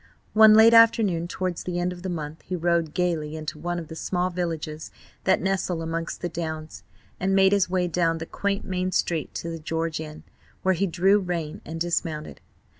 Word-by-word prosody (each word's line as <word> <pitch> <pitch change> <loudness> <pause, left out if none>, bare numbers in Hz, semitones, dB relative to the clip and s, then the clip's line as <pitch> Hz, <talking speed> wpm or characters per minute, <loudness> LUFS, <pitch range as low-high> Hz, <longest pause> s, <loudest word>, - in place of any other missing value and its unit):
One 220 0 +8
late 225 +1 +7
afternoon 220 -7 +5
towards 185 -1 -3
the 180 -1 -4
end 180 +1 -1
of 175 - -11
the 190 - -4
month 155 -2 -5
he 185 - -4
rode 170 -2 0
gaily 165 -4 -1
into 155 0 -6
one 175 +2 -3
of 165 -2 -6
the 160 - -8
small 180 +2 -1
villages 160 -3 -4 0.4
that 190 - +4
nestle 190 -3 -1
amongst 165 0 -4
the 175 - -1
Downs, 160 -2 -5 0.4
and 195 +1 +1
made 190 0 +5
his 200 -3 +2
way 180 -1 +1
down 165 -1 +1
the 165 - -5
quaint 200 +3 -2
main 185 0 -2
street 165 -3 -1
to 170 - -4
the 165 - -6
George 160 0 -2
Inn, 155 -1 -8 0.4
where 190 - +3
he 195 +3 0
drew 190 +4 +3
rein 170 -5 -4
and 165 +1 -6
dismounted. 165 -2 -2
175 Hz, 195 wpm, -25 LUFS, 160-185 Hz, 0.4 s, One